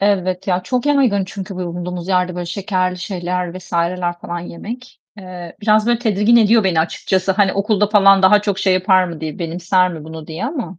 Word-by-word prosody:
Elbet 185 -2 0
ya, 180 -1 0
çok 250 +7 -2
yaygın 255 -9 +2
çünkü 195 0 -7
bulunduğumuz 180 0 -5
yerde 180 -1 +1
böyle 175 -1 -5
şekerli 185 0 -2
şeyler 180 -1 -4
vs.ler 175 0 -2
falan 175 0 -5
yemek. 230 +9 -9 0.2
Eee, 180 -3 -9
biraz 215 0 +3
böyle 240 -1 +2
tedirgin 220 0 +2
ediyor 225 -1 +4
beni 175 -4 +2
açıkçası, 185 +3 -1
hani, 195 0 +2
okulda 205 +1 +1
falan 195 -2 +5
daha 205 +2 +5
çok 200 -2 -1
şey 190 -2 +2
yapar 185 0 +3
mı 170 -3 -7
diye, 160 +4 -5
benimser 180 +2 0
mi 160 -3 -8
bunu 160 -1 -9
diye 160 +1 -5
ama. 245 - -5
185 Hz, 190 wpm, -18 LUFS, 175-205 Hz, 0.2 s, falan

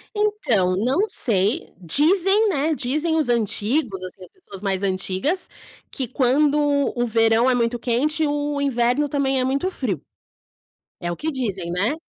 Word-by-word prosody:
Então, 275 - +1
não 270 - +1
sei, 220 - 0
dizem, 380 - +3
né, 310 -3 0
dizem 305 +6 -1
os 300 -6 +1
antigos, 220 -1 0
as 185 - -7 0.2
pessoas 200 - -12
mais 195 -1 -1
antigas, 195 - -1 0.4
que 260 -3 -4
quando 275 +4 +2 0.4
o 240 - 0
verão 225 +2 +3
é 250 - +3
muito 235 0 0
quente 295 +7 0
o 290 0 -2
inverno 260 +2 +1
também 270 -2 0
é 255 - +1
muito 275 +8 -1
frio. 210 - -3 1.0
É 175 0 -3
o - - -6
que 320 - -2
dizem, 195 - -3
né, 200 - 0
255 Hz, 150 wpm, -22 LUFS, 210-300 Hz, 1.0 s, dizem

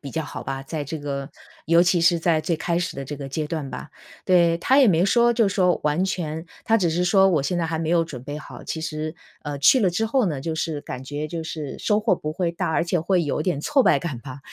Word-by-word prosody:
比 140 - -8
较 160 - -1
好 - - -7
吧， 135 0 -4
在 150 +1 -5
这 160 +3 -5
个 140 -2 -4 0.4
尤 170 +1 +5
其 175 -1 +2
是 170 0 +3
在 160 -2 +2
最 160 +1 -1
开 170 +1 -1
始 180 - -3
的 135 0 -5
这 145 +2 -6
个 140 -1 -7
阶 150 +2 -3
段 155 -5 -3
吧。 - - -8 0.3
对， 170 -2 +4
他 260 +10 +3
也 265 - +7
没 175 -2 +4
说 235 +4 +4
就 230 -3 +2
说 180 -2 +2
完 150 +5 +1
全 165 -4 -3 0.2
他 225 - +3
只 185 -6 +1
是 175 +2 0
说： 190 +2 +5
“我 155 -6 +2
现 175 +5 -1
在 165 - 0
还 160 0 -2
没 160 0 -2
有 170 -1 +3
准 130 -7 -9
备 145 +2 -6
好。” 155 - -11
其 160 - -4
实， 155 -1 -4 0.3
呃， 145 -1 -5
去 240 - +5
了 190 -4 +3
之 220 +6 0
后 250 +1 +2
呢， 150 -6 -2
就 160 +2 -3
是 160 -2 -2
感 130 0 -7
觉 145 +3 -4
就 165 +1 -5
是 155 -3 -6
收 210 -1 +2
获 210 - +2
不 155 -3 -5
会 170 0 -1
大， 170 0 -2
而 165 +1 +1
且 175 0 0
会 175 0 +1
有 150 +1 -1
点 160 -4 -1
挫 280 - +2
败 - - +4
感 145 -9 -5
吧， 130 +1 -9
165 Hz, 290 characters per minute, -23 LUFS, 150-180 Hz, 0.4 s, 也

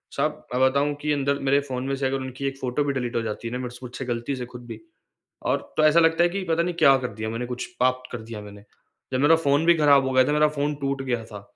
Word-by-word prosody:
साहब, - - -2
मैं 125 - 0
बताऊँ 140 +2 +3
कि 150 - -1
अंदर 140 0 0
मेरे 140 +1 +4
फ़ोन 130 -3 -5
में 135 - -1
से 135 0 -2
अगर 135 +1 0
उनकी 130 +1 -6
1 135 0 -4
फ़ोटो 130 +2 -1
भी 140 -1 -1
डिलीट 125 -2 -3
हो 115 - +1
जाती 110 +1 -5
है - - -5
ना 125 - -3
मेरे 125 - -4
से - - -12
मुझसे 125 +1 -6
गलती 120 +2 -2
से 125 -1 -5
खुद 120 0 -9
भी - - -8 0.7
और - - +3 0.2
तो 155 - +3
ऐसा 155 +2 +6
लगता 165 +1 +4
है 175 - +3
कि 195 +2 -3
पता 165 +1 +2
नहीं 180 - -2
क्या 135 -5 +6
कर 125 -1 -3
दिया 110 +1 -4
मैंने 115 +2 -3
कुछ 125 0 -5
पाप 130 0 +2
कर 120 -2 -5
दिया 110 -1 -8
मैंने। 100 0 -12 0.5
जब 130 - +1
मेरा 145 +4 +6
फ़ोन 145 0 +1
भी 170 - +7
खराब 140 -3 +5
हो - - -1
गया 130 - +6
था - - +1
मेरा 150 0 +4
फ़ोन 150 0 -1
टूट 135 -1 -1
गया 120 -3 -2
था। 105 -2 -10
135 Hz, 290 wpm, -24 LUFS, 125-145 Hz, 0.7 s, भी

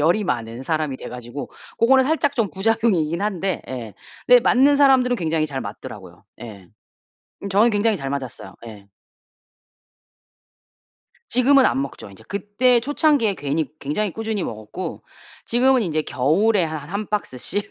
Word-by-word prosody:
열이 175 +8 +2
많은 115 -6 -3
사람이 155 -2 -2
돼 - - -9
가지고 125 +3 -7 0.3
고거는 260 +3 +4
살짝 290 0 0
좀 225 -4 0
부작용이긴 190 -5 0
한데 195 -3 -2
예 120 -5 -7 0.3
근데 250 0 +7
맞는 270 +4 +4
사람들은 260 -3 +4
굉장히 160 -4 0
잘 135 -3 -5
맞더라고요. - - -9 0.2
예. 100 -6 -10 0.7
음 200 - -4
저는 205 +5 +4
굉장히 210 +1 +1
잘 135 -5 -5
맞았어요. 135 -3 -6
예. 105 -3 -11 2.4
지금은 265 +2 +4
안 - - 0
먹죠 135 -6 -8
인제. 95 - -16
그때 210 +5 +2
초창기에 280 -5 +2
괜히 145 +1 -2
굉장히 180 +8 -2
꾸준히 220 -2 -3
먹었고 110 - -6 0.4
지금은 255 +1 +3
인제 155 -5 -1
겨울에 180 - +2
한 155 -2 -6
1 200 +3 -4
박스씩 205 -1 -3
195 Hz, 310 characters per minute, -21 LUFS, 140-230 Hz, 2.4 s, 근데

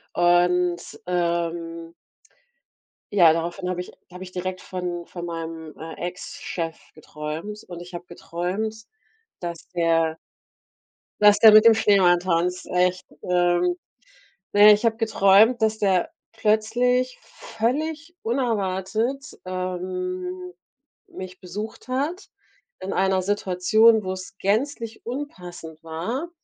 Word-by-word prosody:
Und, 175 0 +3 0.3
ähm 170 -1 -2 1.2
ja, 175 -5 +7
daraufhin 175 +3 -2
habe 180 - -2
ich 180 - -5 0.2
da 180 - -15
habe 180 - -7
ich 185 - -10
direkt 185 0 -4
von 180 -2 -5
von 175 0 -7
meinem, 165 -2 -6
äh, 160 0 -7
Ex-Chef 170 -2 -5 0.2
geträumt 155 +7 -7
und 175 -1 -8
ich 175 +1 -11
habe 175 0 -7
geträumt, 180 +5 -4 0.6
dass 170 -2 -7
der 165 -2 +1 1.0
dass 210 -1 +6
der 220 -1 +9
mit 215 +1 +8
dem 230 - +9
Schneemann 195 -5 +4
tanzt, 180 0 -1
echt, 180 0 +1 0.2
ähm. 175 0 +2 0.8
Na 205 - +5
ja, 210 - +10
ich 210 +3 0
habe 225 -1 +2
geträumt, 220 +1 +4
dass 220 0 +1
der 190 -3 +1 0.2
plötzlich 235 +3 +1
völlig 310 +9 -3
unerwartet, 225 +1 -1
ähm, 185 0 -4 0.5
mich 185 -1 -9
besucht 205 +7 -7
hat 290 +9 -2 0.5
in 190 - -4
einer 190 0 +2
Situation, 205 +3 +3
wo's 185 0 -6
gänzlich 230 +2 -1
unpassend 180 - -7
war. 215 - -4
185 Hz, 115 wpm, -24 LUFS, 175-220 Hz, 1.2 s, ja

